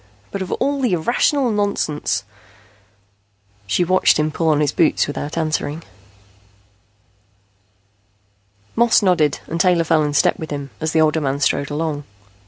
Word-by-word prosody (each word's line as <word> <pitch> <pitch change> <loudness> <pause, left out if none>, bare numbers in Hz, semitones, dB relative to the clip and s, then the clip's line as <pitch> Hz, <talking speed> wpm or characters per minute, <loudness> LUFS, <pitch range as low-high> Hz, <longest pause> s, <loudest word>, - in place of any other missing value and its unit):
But 200 - -4
of 185 - -5
all 280 0 -1
the 245 -7 +1
irrational 240 - +1
nonsense 200 - -1 0.7
" 100 0 -39
She 175 - +1
watched 185 +2 +3
him 155 0 0
put 160 +2 0
on 150 -2 +3
his 150 -2 +1
boots 165 +1 +2
without 145 +2 -5
answering. 155 -1 -2 2.9
Moss 235 -2 +4
nodded 170 -6 +2
and 165 +1 -2
Taylor 180 -2 +3
fell 160 -1 +2
in 145 -1 -1
step - - +2
with 160 - -6
him, 140 -2 -5
as 160 0 -2
the 160 - +2
older 155 0 +2
man 140 -1 -1
strode 140 -1 0
along. 150 -1 -3
155 Hz, 150 wpm, -19 LUFS, 145-180 Hz, 2.9 s, Moss